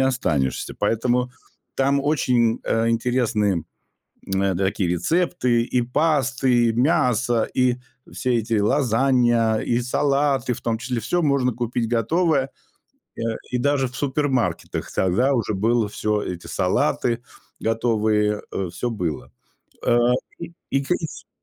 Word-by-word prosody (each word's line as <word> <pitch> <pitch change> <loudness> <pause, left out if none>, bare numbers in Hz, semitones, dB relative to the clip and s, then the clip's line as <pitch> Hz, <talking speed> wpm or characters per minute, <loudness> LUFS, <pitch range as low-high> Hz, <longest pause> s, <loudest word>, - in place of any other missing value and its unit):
останешься. 80 - 0
Поэтому 120 +4 +1 0.5
там 140 +1 +2
очень, 125 -5 +1
э, 115 0 +1
интересные, 115 -6 +1 0.7
м, 95 -1 +1
такие 95 -2 0
рецепты: 125 - +1
и 125 +1 0
пасты, 130 -3 +2
и - - +1
мясо, 120 -3 +2
и 125 -1 +2 0.4
все 125 -2 -1
эти 115 0 -1
лазанья, 120 -1 +2
и 120 +2 0
салаты, 135 0 +1
в - - -5
том 115 -1 -1
числе- 125 0 -3
всё 170 +11 0
можно 140 -4 +2
купить 120 0 -2
готовое. 135 - +1 0.7
Э, - - -5 0.3
и 125 - +1
даже 135 +1 +1
в 125 - -12
супермаркетах 130 - -1
тогда 110 +10 +2
уже 115 -4 0
было 115 +2 +1
всё, 105 0 -1
эти 90 -3 -6
салаты 120 0 0 0.4
готовые, 110 -2 +1
э, 95 -2 -2
всё 120 +7 -3
было. 85 -8 -4 0.6
Э, 120 - +4 0.4
и - - -8 0.2
и 135 - +2
и 160 +3 -5
120 Hz, 125 wpm, -22 LUFS, 110-135 Hz, 0.7 s, Э